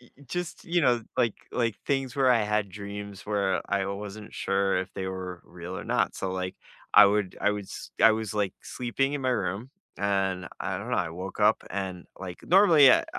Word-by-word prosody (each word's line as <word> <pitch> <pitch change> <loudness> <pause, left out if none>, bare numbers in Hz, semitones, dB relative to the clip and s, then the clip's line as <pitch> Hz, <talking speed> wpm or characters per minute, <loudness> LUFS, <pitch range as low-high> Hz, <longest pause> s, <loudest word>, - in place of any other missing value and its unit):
y 125 - -20
y 140 - -17
just, 175 +6 -4
you 175 -1 +1
know, 120 -5 +3
like 115 -3 +2 0.2
like, 115 -4 0
things 135 -2 -1
where 135 -2 +4
I 115 -3 +4
had 105 -1 0
dreams 100 0 -7
where 100 -2 +1
I 100 -1 +1
wasn't 105 +2 -6
sure 95 -1 +1
if 95 - -4
they 95 - -3
were 95 -1 -5
real 90 +1 -8
or - - -7
not, - - +1
so, 95 - -3
like, 95 0 -3 0.4
I 105 - +10
would 100 -2 0
I 105 - +3
would 105 -1 -3
s - - -9
I 115 - +8
was 110 -1 -3
like 100 -3 0
sleeping 135 +3 -1
in 145 - -3
my 130 - +2
room 105 +2 -2 0.3
and 95 -3 0
I - - -2
don't - - -6
know, - - +1
I - - 0
woke 95 +4 -6
up 105 +1 +4
and 95 -3 -4
like 90 -2 -7
normally 170 -7 +7
I - - +3
105 Hz, 215 wpm, -27 LUFS, 95-120 Hz, 0.4 s, I